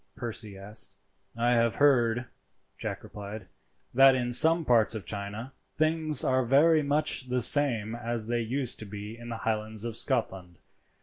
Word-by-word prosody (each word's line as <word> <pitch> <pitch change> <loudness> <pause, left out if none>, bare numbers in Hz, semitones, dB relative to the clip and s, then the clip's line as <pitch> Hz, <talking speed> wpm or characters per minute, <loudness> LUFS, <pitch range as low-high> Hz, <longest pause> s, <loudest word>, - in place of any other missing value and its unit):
Percy 110 -4 -6
asked. 105 +3 -5 0.4
"I 120 +1 +1
have 115 -1 +2
heard," 120 -4 +2 0.5
Jack - - -6
replied, 105 -1 -9 0.5
"that 135 +1 +6
in 125 -1 -2
some 160 +6 +5
parts 115 -3 +3
of 105 -5 -6
China 105 +7 -6 0.2
things 155 -2 +1
are 130 0 +1
very 150 +6 +4
much 145 -2 0
the 125 0 0
same 115 -6 +2
as 120 -1 -3
they 120 +1 -1
used 125 +3 -1
to 110 - -4
be 105 +2 -8
in 120 0 -11
the 115 - -5
Highlands 110 0 -2
of 115 -2 -4
Scotland. 95 - -1
120 Hz, 160 wpm, -28 LUFS, 110-135 Hz, 0.5 s, that